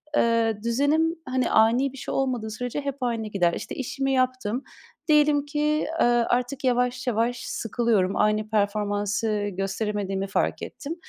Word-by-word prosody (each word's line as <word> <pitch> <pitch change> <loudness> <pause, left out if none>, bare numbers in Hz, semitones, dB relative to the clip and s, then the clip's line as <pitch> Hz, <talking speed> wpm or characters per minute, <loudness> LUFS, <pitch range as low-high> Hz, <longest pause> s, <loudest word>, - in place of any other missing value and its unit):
eee, 230 -3 +2
düzenim, 290 +8 +2
hani, 255 -1 0
ani 240 +5 +4
bir - - -11
şey - - -5
olmadığı 250 -5 -1
sürece 245 +5 -4
hep 280 -1 -3
aynı 230 -3 -1
gider. 180 -5 +1
İşte, - - -5
işimi 270 +1 -2
yaptım, 255 -2 0 0.4
diyelim 300 -2 +4
ki, 300 +1 0
aaa, 240 -1 +3
artık 250 +3 -1
yavaş 250 0 +1
yavaş 235 +1 +1
sıkılıyorum, 220 -4 0
aynı 215 0 +1
performansı 205 0 0
gösteremediğimi 195 0 -2
fark 195 - -1
ettim. 300 +4 -6
240 Hz, 140 wpm, -25 LUFS, 210-265 Hz, 0.4 s, ani